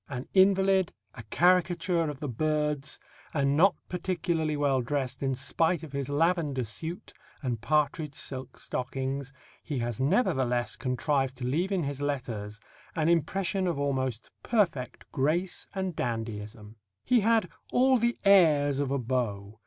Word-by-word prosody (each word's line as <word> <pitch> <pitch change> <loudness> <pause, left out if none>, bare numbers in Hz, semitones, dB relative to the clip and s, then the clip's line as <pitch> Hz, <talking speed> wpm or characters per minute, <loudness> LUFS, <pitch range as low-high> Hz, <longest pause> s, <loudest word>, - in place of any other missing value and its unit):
An 130 -2 -5
invalid, 190 -1 +4 0.2
a - - -9
caricature 180 -1 +2
of 145 -2 -7
the 150 - -2
birds, 150 +2 -1 0.4
and 140 -1 +2
not 185 +5 +5
particularly 170 -4 -1
well 140 -3 +2
dressed 130 0 -2
in 135 -1 0
spite 160 +5 0
of 155 - -8
his 140 -1 -3
lavender 150 -3 +1
suit 160 +10 -6 0.3
and 120 -4 -2
partridge 150 +2 0
silk 130 -3 -5
stockings, 135 +1 -3 0.3
he 145 - -4
has 120 -2 -2
nevertheless 130 - +1
contrived 130 +1 -1
to 125 - -4
leave 165 +10 0
in 185 -4 +1
his 140 0 -4
letters 115 -7 -3 0.4
an 160 -1 +1
impression 185 +3 +1
of 170 - -1
almost 130 -4 -2
perfect 170 - 0
grace 165 +7 0
and 190 -3 -2
dandyism. 110 -2 -4 0.3
He 250 - +4
had 225 -2 +3 0.2
all 260 0 +4
the 235 +1 +1
airs 150 -8 +5
of 140 -2 0
a 140 - +1
beau. 110 -5 -2
145 Hz, 145 wpm, -28 LUFS, 130-175 Hz, 0.4 s, not